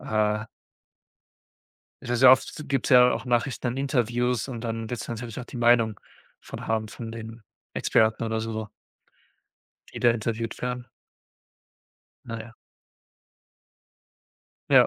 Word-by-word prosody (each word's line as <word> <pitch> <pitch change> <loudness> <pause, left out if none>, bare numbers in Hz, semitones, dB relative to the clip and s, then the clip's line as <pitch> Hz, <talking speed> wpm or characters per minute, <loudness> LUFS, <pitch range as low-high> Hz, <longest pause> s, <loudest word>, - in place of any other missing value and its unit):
Äh. 105 0 0 1.6
Se 120 - -2
sehr 130 +1 +8
oft 130 +3 +2
gibt's 135 -3 0
ja 125 -1 +8
auch - - -2
Nachrichten 125 +1 0
an 120 - -3
Interviews 125 -2 0
und 120 -3 -5
dann 115 -1 -4
wird's 120 -3 -4
natürlich 115 0 -5
auch - - -7
die - - -9
Meinung 120 -3 +3 0.4
von - - -8
haben 110 -1 -1
von 115 +2 -7
den 115 0 -8 0.3
Experten 110 +1 +2
oder 110 0 -1
so 115 0 -4
so 110 -1 -4 1.2
die - - -7
da 120 - +5
interviewt 115 0 -3
werden. 125 0 -3 1.4
Na 115 -1 -5
ja. 110 +1 -10 2.2
Ja. - - +7
115 Hz, 130 wpm, -26 LUFS, 110-125 Hz, 2.2 s, sehr